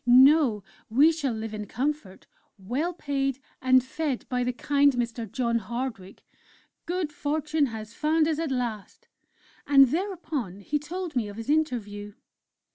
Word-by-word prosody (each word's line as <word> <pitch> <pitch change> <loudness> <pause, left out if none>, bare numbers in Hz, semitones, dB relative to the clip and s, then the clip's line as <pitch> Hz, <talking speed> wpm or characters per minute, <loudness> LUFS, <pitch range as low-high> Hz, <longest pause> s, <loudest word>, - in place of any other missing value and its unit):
No! 260 -3 +6 0.3
we 280 +8 +6
shall 300 -5 -2
live 220 0 -5
in 210 -1 -5
comfort, 260 -7 -3 0.3
well 250 - -2
paid, 275 -5 -2 0.2
and 255 -1 +5
fed 275 0 -3
by 250 -1 0
the 250 - 0
kind 285 +3 +3
Mr. 235 -3 -3
John 235 -2 0
Hardwick.... 225 -3 -6 0.6
Good 350 -3 -1
Fortune 305 0 0
has 220 -1 -7
found 310 +2 +2
us 315 -1 0
at 325 -2 -1
last!" 240 -6 -4 0.6
And 275 -2 +7
thereupon 310 - -3
he 295 +8 -1
told 340 +2 -5
me 235 -4 0
of 205 0 -9
his 225 +5 -2
interview. 210 -9 -1
260 Hz, 145 wpm, -27 LUFS, 225-300 Hz, 0.6 s, And